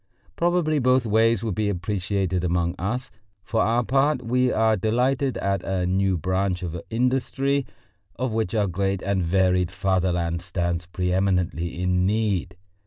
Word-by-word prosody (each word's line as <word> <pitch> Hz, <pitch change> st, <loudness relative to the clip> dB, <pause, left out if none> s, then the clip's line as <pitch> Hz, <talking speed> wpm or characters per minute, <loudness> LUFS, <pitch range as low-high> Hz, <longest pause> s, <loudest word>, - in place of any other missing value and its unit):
Probably 170 Hz, -3 st, +1 dB
both 130 Hz, -1 st, +3 dB
ways 115 Hz, 0 st, +2 dB
would 110 Hz, -3 st, -1 dB
be 105 Hz, +2 st, 0 dB
appreciated 95 Hz, -1 st, -1 dB
among 85 Hz, 0 st, 0 dB
us. 125 Hz, +8 st, -3 dB, 0.3 s
For 110 Hz, +2 st, 0 dB
our 120 Hz, +2 st, +2 dB
part, 135 Hz, +2 st, +1 dB
we 125 Hz, +2 st, +1 dB
are 110 Hz, 0 st, +3 dB
delighted 125 Hz, +6 st, 0 dB
at 100 Hz, -1 st, -1 dB
a 95 Hz, -1 st, -1 dB
new 95 Hz, 0 st, +1 dB
branch 95 Hz, +2 st, -1 dB
of 85 Hz, -1 st, -4 dB
industry, 135 Hz, +3 st, 0 dB, 0.5 s
of 125 Hz, -1 st, -2 dB
which 110 Hz, -2 st, -1 dB
our 105 Hz, -2 st, +2 dB
great 95 Hz, +1 st, -1 dB
and 100 Hz, -1 st, 0 dB
varied 90 Hz, 0 st, +2 dB
fatherland 90 Hz, -3 st, 0 dB
stands 85 Hz, -1 st, -2 dB
pre 90 Hz, 0 st, -2 dB
eminently 90 Hz, -3 st, 0 dB
in 90 Hz, 0 st, +1 dB
need. 100 Hz, -4 st, 0 dB
100 Hz, 150 wpm, -24 LUFS, 90-115 Hz, 0.5 s, both